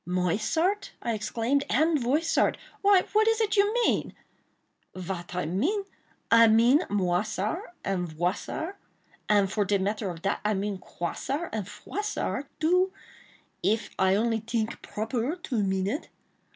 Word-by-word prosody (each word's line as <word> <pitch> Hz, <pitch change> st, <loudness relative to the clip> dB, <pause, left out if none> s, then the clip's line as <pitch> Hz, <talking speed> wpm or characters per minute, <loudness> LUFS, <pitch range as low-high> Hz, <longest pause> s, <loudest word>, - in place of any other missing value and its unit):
"Moissart?" 215 Hz, -, 0 dB
I 235 Hz, -, 0 dB
exclaimed, 230 Hz, +6 st, 0 dB
"and 310 Hz, +6 st, +3 dB
Voissart! 285 Hz, +7 st, +2 dB, 0.2 s
Why, 395 Hz, -2 st, +5 dB
what 435 Hz, +1 st, +4 dB
is 450 Hz, 0 st, +3 dB
it 430 Hz, -2 st, +1 dB
you 405 Hz, 0 st, +4 dB
mean?" -, -, 0 dB, 0.8 s
"Vat 180 Hz, -1 st, -5 dB
I 180 Hz, -, -1 dB
mean?—I 230 Hz, -, +1 dB
mean 230 Hz, +6 st, +5 dB
Moissart 205 Hz, -, -1 dB
and 185 Hz, -3 st, -1 dB
Voissart; 185 Hz, -, -3 dB, 0.5 s
and 200 Hz, -2 st, +4 dB
for 210 Hz, -, +1 dB
de 200 Hz, +1 st, +2 dB
matter 200 Hz, +1 st, -1 dB
of 170 Hz, -1 st, -8 dB
dat, 200 Hz, -, 0 dB
I 210 Hz, 0 st, +1 dB
mean 200 Hz, 0 st, -2 dB
Croissart 270 Hz, -, -4 dB
and 210 Hz, -4 st, -3 dB
Froissart, 340 Hz, -, -3 dB
too, 365 Hz, +4 st, +3 dB, 0.7 s
if 220 Hz, +2 st, 0 dB
I 190 Hz, 0 st, +4 dB
only 225 Hz, +1 st, +1 dB
tink 225 Hz, 0 st, -2 dB
proper 230 Hz, +7 st, -2 dB
to 260 Hz, -11 st, -2 dB
mean 190 Hz, -1 st, 0 dB
it. 280 Hz, -, -3 dB
220 Hz, 140 wpm, -27 LUFS, 195-320 Hz, 0.8 s, Why